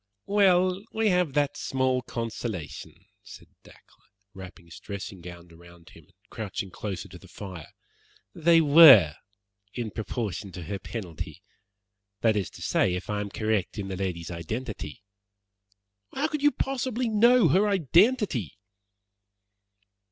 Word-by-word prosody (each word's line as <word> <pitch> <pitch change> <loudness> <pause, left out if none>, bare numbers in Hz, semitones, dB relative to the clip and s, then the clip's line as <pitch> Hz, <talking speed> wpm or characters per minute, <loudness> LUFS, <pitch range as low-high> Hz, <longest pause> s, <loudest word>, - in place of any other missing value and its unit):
"Well, 185 -2 +3
we 220 -1 +2
have 180 -6 +1
that 145 -1 +1
small 130 -1 0
consolation," 115 -7 -6 0.2
said - - -14
Dacre, - - -17 0.6
wrapping 95 -3 -11
his 85 - -12
dressing 100 -2 -8
gown 85 0 -11
round 85 +1 -17
him 80 - -17
and - - -31 0.2
crouching 100 -3 -5
closer 95 -3 -6
to 90 -1 -13
the 95 - -16
fire. 90 -5 -9 0.7
"They 165 0 +4
WERE 140 - +8 0.6
in 115 -3 -4
proportion 105 -3 -4
to 90 0 -7
her 100 +5 -5
penalty. 90 -10 -7 0.8
That 110 -2 +3
is 100 -4 -1
to - - -11
say, 90 - +1
if 90 - -5
I 105 0 -1
am 100 - -5
correct 110 -1 -2
in 100 -2 -4
the 95 - -4
lady's 90 -3 -4
identity." 105 - -6 1.1
"How 280 - -2
could 300 -3 -3
you 290 - +5
possibly 255 -3 -2
know 235 +3 +4
her 200 +4 +3
identity?" 185 - +2
110 Hz, 135 wpm, -26 LUFS, -, 1.1 s, WERE